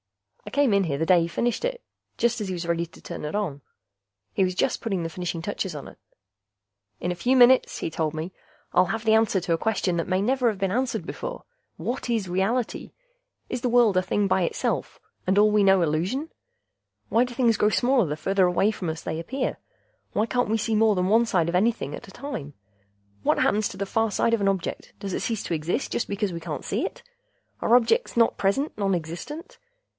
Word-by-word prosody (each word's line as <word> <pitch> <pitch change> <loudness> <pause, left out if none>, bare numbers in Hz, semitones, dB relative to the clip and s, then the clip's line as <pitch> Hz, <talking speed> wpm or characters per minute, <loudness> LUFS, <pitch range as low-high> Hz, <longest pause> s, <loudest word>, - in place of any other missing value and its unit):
I - - -3
came 280 -5 +2
in 200 -1 +3
here 140 -4 -1
the 160 - 0
day 180 0 +5
he 165 - 0
finished 235 - -1
it, - - -2 0.4
just 235 -1 +1
as 205 - -3
he 185 - -3
was 175 -1 -4
ready 170 0 0
to - - -17
turn - - -7
it 150 +5 -3
on. 170 -10 -2 0.7
He 195 - +2
was 185 -1 0
just 255 - 0
putting 195 -6 -2
the 165 - -3
finishing 170 -1 -4
touches 190 -3 -3
on 145 - -7
it. - - -14 1.0
"In 175 - -2
a - - -2
few 250 +9 +2
minutes," 250 +1 +5
he - - -3
told 155 -1 -1
me, 165 +4 -5 0.4
"I'll 180 0 +4
have 225 +4 -3
the 220 - +4
answer 220 -3 +3
to 175 -1 -1
a - - +2
question 200 -5 0
that 165 - -1
may 185 0 +2
never 250 +4 +2
have 215 - -3
been 195 -1 -1
answered 250 +4 -1
before: - - -6 0.3
what 245 0 -4
is 225 -5 0
reality? 195 +7 -1 0.6
Is 250 - -4
the 245 - 0
world 235 -4 +4
a 185 - +4
thing 200 +2 0
by 190 0 +2
itself, 170 - -2 0.3
and 190 +2 +2
all 210 +1 +6
we 210 -1 +4
know 195 -2 +5
illusion? 180 - -1 0.8
Why 230 - +4
do 245 -1 -5
things 235 -2 +3
grow 210 - +3
smaller 245 -2 +2
the 150 +1 -3
farther 190 +2 +2
away 185 +4 +2
from 185 -5 -4
us 160 0 -5
they 160 0 -3
appear? 255 +11 -3 0.6
Why 215 - +2
can't 245 -1 0
we 225 - +2
see 220 0 0
more 215 -1 +4
than 180 0 +1
one 225 +4 +4
side 175 -6 +2
of 170 - -1
anything 225 +5 +1
at 240 - -8
a - - -12
time? 225 - -6 0.7
What - - +2
happens 210 +1 +2
to 195 - -9
the 200 - -2
far 225 +3 +1
side 230 +3 +1
of 230 - +2
an 195 - +3
object; 190 -3 -3
does 195 -2 -4
it - - -2
cease 225 -4 -2
to - - -3
exist 165 - -2
just - - -2
because 200 -2 -1
we 170 - -4
can't 160 -2 -5
see - - -1
it? - - -5 0.6
Are 235 - +4
objects 250 - +2
not 230 -1 +4
present 205 +9 0
nonexistent? 195 - -3
200 Hz, 225 wpm, -25 LUFS, 175-235 Hz, 1.0 s, all